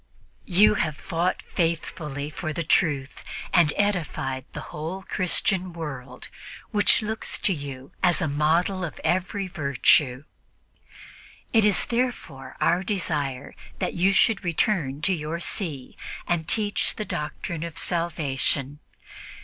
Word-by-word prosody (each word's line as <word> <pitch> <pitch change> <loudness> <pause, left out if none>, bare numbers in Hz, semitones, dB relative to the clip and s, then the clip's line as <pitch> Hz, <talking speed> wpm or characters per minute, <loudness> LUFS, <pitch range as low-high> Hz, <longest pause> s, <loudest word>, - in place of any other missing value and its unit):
You 200 +3 +6
have 155 -7 -1
fought 175 +2 -1
faithfully 155 -4 -2
for 155 0 -4
the 170 - -2
Truth 145 -4 +1 0.3
and 170 -4 +5
edified 155 -10 -1
the - - -6
whole 165 +6 -5
Christian 185 0 0
world, 135 -6 -7 0.4
which 210 0 +4
looks 220 +1 -1
to 195 - +2
you 140 -3 -7
as 175 -3 +4
a 160 - +1
model 165 +6 +1
of 170 - -5
every 190 +2 0
virtue. 140 -4 +3 1.3
It 220 -2 +5
is 205 -2 +4
therefore 235 - -3
our 175 +2 +3
desire 150 -9 -2 0.2
that - - -2
you 185 +3 +3
should 200 +2 +3
return 165 -5 0
to 190 - +4
your 160 0 -3
See 160 - -4 0.3
and 165 -2 0
teach 205 -2 +1
the 215 - -3
doctrine 155 0 -4
of 170 -1 -5
salvation. 145 -5 -1
170 Hz, 125 wpm, -25 LUFS, 145-185 Hz, 1.3 s, You